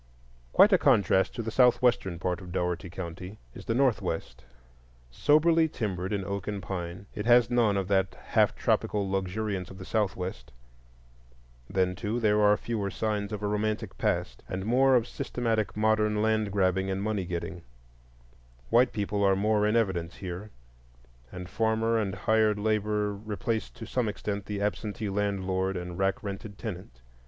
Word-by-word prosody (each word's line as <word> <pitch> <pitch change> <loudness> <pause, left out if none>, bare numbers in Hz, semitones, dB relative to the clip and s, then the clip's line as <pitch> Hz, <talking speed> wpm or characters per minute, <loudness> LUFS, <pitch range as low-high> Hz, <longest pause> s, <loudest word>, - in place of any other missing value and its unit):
Quite - - +6
a - - +6
contrast 95 -1 +3
to 115 - -3
the 115 - -4
southwestern 125 -7 +3
part 90 +1 -2
of 90 -1 -9
Dougherty 90 0 -2
County 90 +3 -7 0.2
is - - -10
the 115 - 0
northwest. 110 - 0 0.7
Soberly 160 - +4
timbered 95 -7 -3
in 100 -2 -1
oak 100 0 -4
and 105 -1 -2
pine, 90 -1 -5
it 105 0 -4
has 120 -1 +5
none 115 -5 +3
of 95 -2 -1
that 95 -1 +1
half - - +1
tropical 100 -2 0
luxuriance 95 0 -2
of 95 - -11
the 95 - -9
southwest. 95 -4 -2 1.2
Then, 95 -1 +1
too, 105 +6 -3
there 105 -2 +3
are 105 0 +5
fewer 105 -4 -3
signs 105 0 -2
of 105 -1 -5
a - - +1
romantic 105 +1 -2
past, - - -1
and 95 +1 -3
more 130 +3 +4
of 120 -1 +2
systematic 115 -5 -2
modern 105 -1 +2
land 110 -1 +1
grabbing 95 -1 +1
and 95 +1 -2
money 105 -2 -1
getting. 85 0 -5 1.1
White 120 +1 +4
people 100 -1 -1
are 95 -1 +4
more 105 +1 +2
in 105 - +1
evidence 95 -7 0
here, 95 +3 -6 0.8
and 90 0 -7
farmer 110 +2 +1
and 100 -3 -2
hired 110 +1 +2
labor 105 -1 0
replace 110 +2 -3
to 115 - -10
some 115 0 -1
extent 100 0 -4
the 100 -1 -3
absentee 105 +1 -2
landlord 95 -2 -1
and 90 0 -6
rack 95 0 0
rented 100 0 -6
tenant. 90 - -7
105 Hz, 160 wpm, -28 LUFS, 95-110 Hz, 1.2 s, Quite